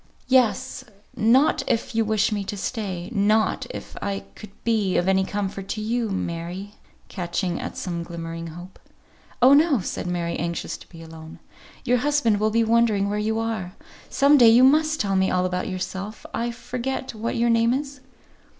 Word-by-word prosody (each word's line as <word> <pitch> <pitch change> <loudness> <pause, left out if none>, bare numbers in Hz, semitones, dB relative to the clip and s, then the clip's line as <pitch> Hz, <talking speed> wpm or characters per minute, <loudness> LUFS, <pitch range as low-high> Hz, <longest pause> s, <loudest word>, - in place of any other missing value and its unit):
"Yes. 255 +1 +2 0.3
Not 250 +7 +4
if 230 - -1
you 225 0 +2
wish 215 0 +1
me 205 -1 -1
to 205 - -5
stay. 190 -3 -4
Not 215 +1 +2
if - - -8
I 200 -1 -3
could 215 - -11
be 215 -5 +1
of 175 - +1
any 190 0 +3
comfort 195 -1 -4
to 215 - -3
you, 230 +1 -1
Mary;" 180 +1 -4 0.4
catching 175 -1 -3
at - - -6
some 170 -2 -3
glimmering 165 0 -6
hope. 175 +3 -11 0.6
"Oh, 260 +2 +8
no," 295 -3 +5
said 180 - -4
Mary, 170 -1 -2
anxious 170 +1 -3
to - - -17
be 165 -2 -12
alone. 160 0 -11 0.5
"Your 250 0 +3
husband 250 -5 +1
will 215 +1 +2
be 230 +1 +2
wondering 220 -3 +2
where 210 - -1
you 220 +1 -1
are. 220 -5 -3 0.4
Some 285 +1 +4
day 235 -2 +8
you 235 +3 +6
must 310 +3 +4
tell 195 -2 0
me 190 0 +2
all 180 0 +1
about 180 +1 -2
yourself. 190 +3 -5
I 235 +1 -1
forget 250 +2 -4
what 225 +1 -3
your 235 0 +2
name 230 0 +3
is?" 275 +1 -3
210 Hz, 175 wpm, -24 LUFS, 185-235 Hz, 0.6 s, Oh